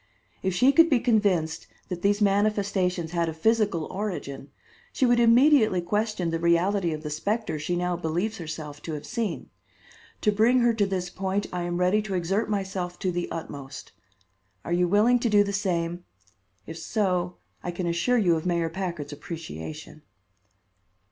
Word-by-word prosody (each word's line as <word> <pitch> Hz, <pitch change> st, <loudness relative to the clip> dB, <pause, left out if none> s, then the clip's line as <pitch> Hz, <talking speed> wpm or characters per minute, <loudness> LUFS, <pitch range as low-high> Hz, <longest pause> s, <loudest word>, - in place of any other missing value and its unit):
If 190 Hz, -1 st, -1 dB
she 255 Hz, +9 st, +5 dB
could 330 Hz, +3 st, +6 dB
be 265 Hz, -5 st, +4 dB
convinced 200 Hz, -9 st, +1 dB, 0.2 s
that 180 Hz, -2 st, -4 dB
these 205 Hz, +1 st, +2 dB
manifestations 195 Hz, -4 st, +1 dB
had 170 Hz, -1 st, 0 dB
a 160 Hz, -, -6 dB
physical 205 Hz, -3 st, +1 dB
origin, 175 Hz, -9 st, -5 dB, 0.4 s
she 260 Hz, -, +1 dB
would 240 Hz, -1 st, +4 dB
immediately 235 Hz, -3 st, +5 dB
question 205 Hz, -1 st, -1 dB
the 165 Hz, -, -1 dB
reality 170 Hz, +2 st, +2 dB
of 155 Hz, 0 st, -5 dB
the 150 Hz, -, -4 dB
specter 200 Hz, +2 st, -2 dB
she 165 Hz, +4 st, -2 dB
now 180 Hz, 0 st, 0 dB
believes 175 Hz, +6 st, -2 dB
herself 155 Hz, -2 st, -7 dB
to 160 Hz, -, -5 dB
have 150 Hz, 0 st, -6 dB
seen. 225 Hz, -5 st, -3 dB, 0.7 s
To 210 Hz, -, +3 dB
bring 230 Hz, +5 st, +3 dB
her 240 Hz, -1 st, +4 dB
to 210 Hz, -3 st, +1 dB
this 180 Hz, -2 st, -3 dB
point 195 Hz, +2 st, -2 dB
I 180 Hz, -, -2 dB
am 175 Hz, 0 st, -2 dB
ready 180 Hz, +4 st, +2 dB
to 200 Hz, -2 st, -4 dB
exert 195 Hz, +6 st, 0 dB
myself 190 Hz, -3 st, -3 dB
to 185 Hz, -, -1 dB
the 175 Hz, 0 st, -3 dB
utmost. 140 Hz, -4 st, -7 dB, 0.7 s
Are 170 Hz, -, -2 dB
you 175 Hz, 0 st, +2 dB
willing 215 Hz, +6 st, +4 dB
to 235 Hz, -, 0 dB
do 205 Hz, -1 st, +5 dB
the 200 Hz, 0 st, -4 dB
same? 175 Hz, -3 st, -1 dB, 0.6 s
If -, -, -8 dB
so, 180 Hz, -4 st, -1 dB, 0.2 s
I -, -, -4 dB
can 175 Hz, +1 st, -3 dB
assure 170 Hz, +9 st, +1 dB
you 180 Hz, -7 st, +3 dB
of 160 Hz, -, -3 dB
Mayor 170 Hz, -2 st, 0 dB
Packard's 170 Hz, -5 st, -4 dB
appreciation." 155 Hz, -, -8 dB
180 Hz, 170 wpm, -26 LUFS, 170-210 Hz, 0.7 s, could